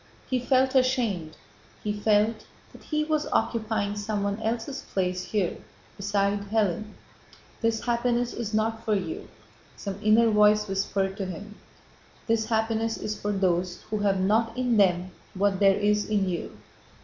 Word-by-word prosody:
He 255 - 0
felt 260 +1 +2
ashamed; 240 - +1 0.5
he 210 - -1
felt 210 +1 +1 0.3
that - - -15
he 305 -1 0
was 310 0 0
occupying 215 -3 0
someone 205 0 -2
else's 230 +5 -2
place 185 -1 -2
here 185 -2 -1 0.4
beside 200 0 0
Hélène. 215 -1 0 0.7
"This 225 -1 +1
happiness 240 0 +1
is 230 -3 -4
not 220 +1 0
for 215 -2 +1
you," 330 - -4 0.5
some 200 -1 -5
inner 220 +1 +5
voice 210 0 +4
whispered 195 0 -1
to 195 -3 -3
him. 200 +4 -7 0.7
"This 225 -1 +1
happiness 225 0 0
is 215 - -3
for 205 - -3
those 180 -2 0
who 215 - 0
have 200 -2 +2
not 225 +5 +1
in 250 -3 +1
them 185 -2 +3 0.2
what 195 0 +1
there 195 -1 +5
is 210 +1 +1
in 205 -3 +1
you." 175 -2 -4
210 Hz, 150 wpm, -26 LUFS, 200-225 Hz, 0.7 s, inner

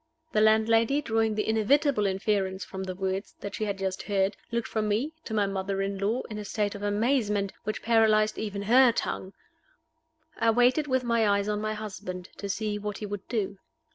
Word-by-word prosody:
The 215 - +2
landlady, 225 +4 +4
drawing 225 -2 +1
the 210 - -1
inevitable 225 +1 +3
inference 190 -1 -1
from 190 0 -6
the 185 -1 -5
words 190 +1 -3
that 200 - -5
she 215 - -2
had 200 -2 -2
just 190 -1 -2
heard, 195 -1 0 0.2
looked 235 0 -1
from 215 -1 -1
me 235 +10 0
to 220 - -5
my 205 -1 +3
mother 195 0 -2
in 195 0 -3
law 215 +6 0
in 215 -2 -6
a - - -5
state 205 0 -1
of 205 - -8
amazement, 205 -1 +1
which 215 - -3
paralyzed 220 -2 +3
even 205 -2 -3
her 245 +4 +6
tongue. 190 -4 -3 1.1
I 230 -1 +3
waited 245 +6 +3
with 260 -2 +1
my 230 -3 +2
eyes 200 0 +2
on 210 0 -1
my 215 0 -2
husband, 190 -4 -6
to 200 - -5
see 210 0 -2
what 210 -1 -4
he 210 - -5
would 205 -2 -6
do. 200 -4 -2
210 Hz, 200 wpm, -28 LUFS, 200-225 Hz, 1.1 s, her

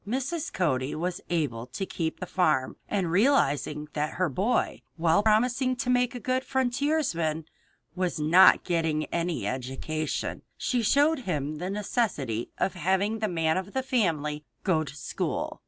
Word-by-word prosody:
Mrs. 270 +8 -2
Cody 135 -7 0
was 175 +2 -3
able 140 -9 -1
to 130 +10 -4
keep 165 -3 -3
the 185 - -4
farm, 155 -9 +1
and 190 -5 0
realizing 150 - +2
that 150 0 -1
her 185 -2 +1
boy, 200 - 0
while 165 +2 +3
promising 245 +4 +2
to 245 +1 -1
make 250 0 +2
a - - -4
good 255 +3 0
frontiersman, 245 - 0 0.5
was 180 -3 -1
not 160 +5 +6
getting 160 -3 0
any 170 -1 -1
education, 135 +5 -3 0.2
she 245 -2 0
showed 290 +7 +3
him 155 - -3
the 180 +2 -3
necessity 195 - -1
of - - 0
having 190 +5 0
the 215 - 0
"man 165 -3 +1
of 190 +2 -4
the 265 - -1
family" 160 - 0 0.2
go 165 -5 +2
to 150 -1 -9
school. 150 - -3
180 Hz, 155 wpm, -27 LUFS, 155-235 Hz, 0.5 s, not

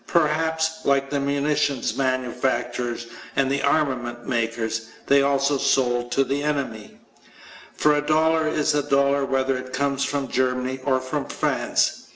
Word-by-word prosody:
Perhaps, 160 0 +1
like 140 0 +1
the 145 - 0
munitions 140 -1 0
manufacturers 125 -2 -1 0.3
and 135 0 +2
armament 130 -5 0
makers, 115 -2 -2 0.2
they 140 0 +5
also 140 0 +2
sold 120 -2 +1
to 135 - +3
the 140 +2 -2
enemy. 140 -8 -3 0.8
For 150 - +3
a 145 - +1
dollar 160 +1 +2
is 155 0 +1
a 145 - +2
dollar 140 0 +2
whether 135 0 +1
it 130 0 -9
comes 140 0 0
from 140 -1 -2
Germany 130 0 -1
or 130 -2 +2
from 130 +2 -3
France. - - 0
135 Hz, 140 wpm, -23 LUFS, 125-145 Hz, 0.8 s, they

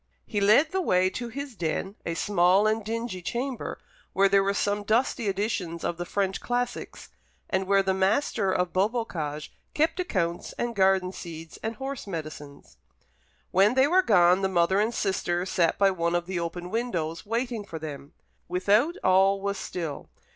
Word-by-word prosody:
He 205 -3 -2
led 220 +11 +5
the 380 - 0
way 185 - +2
to 240 +3 -5
his 275 +1 -6
den, 175 +2 -2
a 165 - -2
small 190 +2 +3
and 215 0 +1
dingy 225 -3 -4
chamber, 245 +7 -3 0.4
where 195 +1 +4
there 195 0 +4
were 200 +1 0
some 205 +1 0
dusty 225 +2 +1
editions 190 -5 -2
of 170 - -2
the 175 0 -5
French 195 -1 -1
classics, 245 0 -3 0.4
and 190 -1 0
where 195 0 +4
the 190 0 +1
master 195 +1 +1
of 180 -1 0
Beaubocage 185 -8 -2 0.2
kept 320 +4 +1
accounts 175 - -2
and 240 -1 -3
garden 190 -1 +3
seeds 165 -3 -9
and 225 +1 -3
horse 270 -1 -6
medicines. 155 -5 -8 0.7
When 200 +6 +4
they 265 +1 +5
were 360 +6 +4
gone, 180 - +4
the 190 - +1
mother 185 +1 +2
and 215 +3 +2
sister 180 -5 -1
sat 175 -3 +1
by 195 -1 +4
one 170 -1 -1
of 175 0 0
the 185 -1 -3
open 175 +1 -5
windows, 175 -9 -2
waiting 230 0 -2
for 170 -5 -7
them. 150 -2 -8 0.3
Without 205 - +2
all 195 +1 +4
was 200 0 -2
still. 165 -5 -5
195 Hz, 170 wpm, -27 LUFS, 175-225 Hz, 0.7 s, led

